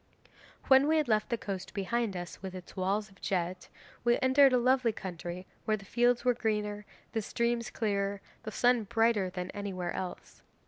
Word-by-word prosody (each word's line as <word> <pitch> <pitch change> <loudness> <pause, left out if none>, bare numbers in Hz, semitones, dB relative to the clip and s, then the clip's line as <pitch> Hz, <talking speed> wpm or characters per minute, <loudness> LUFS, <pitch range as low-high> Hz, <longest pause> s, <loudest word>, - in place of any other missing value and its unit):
'When 265 +1 +6
we 315 +1 +4
had 305 -3 +1
left 215 0 +2
the 235 - 0
coast 195 -3 -6
behind 210 0 -1
us, 175 0 -7
with 190 -1 -6
its 185 -1 -10
walls 200 +2 -1
of 190 - -22
jet, 180 -1 -2 0.3
we 240 0 +4
entered 265 +1 +6
a 250 - +4
lovely 255 -1 +3
country 180 -2 -6 0.2
where 215 -1 +2
the 195 - -13
fields 240 +4 +2
were 250 - +5
greener, 210 -3 -2 0.2
the 225 - -1
streams 235 +2 -1
clearer, 200 -3 0
and 200 - -9 0.2
the 215 - -5
sun 245 0 +3
brighter 225 -2 +2
than 180 0 -5
anywhere 190 -4 -4
else. 185 -1 -6
210 Hz, 185 wpm, -31 LUFS, 190-240 Hz, 0.3 s, When